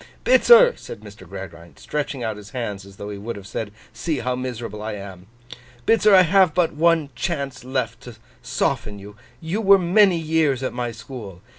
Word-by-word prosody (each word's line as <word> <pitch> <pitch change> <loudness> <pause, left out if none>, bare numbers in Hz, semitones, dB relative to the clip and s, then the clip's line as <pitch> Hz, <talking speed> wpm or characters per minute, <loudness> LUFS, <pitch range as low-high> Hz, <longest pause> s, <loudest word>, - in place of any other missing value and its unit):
'Bitzer,' 485 0 +7
said - - -10
Mr. 105 -4 -13
Gradgrind, 85 -5 -10
stretching 145 -4 -4
out 110 -2 -2
his 105 0 -12
hands 105 -6 -5
as 100 - -15
though 100 +1 -7
he 100 - -7
would 115 +4 -5
have 100 -2 -10
said, 105 +2 -5 0.2
See 150 +6 -2
how 125 +1 -2
miserable 120 -4 -5
I 110 0 -4
am! 95 -2 -9 0.6
'Bitzer, 220 -2 +4
I 185 - +8
have 180 -2 +3
but 175 -2 +2
one 160 -1 +2
chance 140 +2 -4
left 125 -3 -3
to 120 -2 -11 0.3
soften 105 -1 -2
you. 100 +1 -12 0.3
You 170 +7 -2
were 200 -1 +7
many 185 +1 +4
years 155 -5 0
at 130 - -2
my 120 -1 -3
school. 110 -5 -10
125 Hz, 185 wpm, -22 LUFS, 105-160 Hz, 0.6 s, I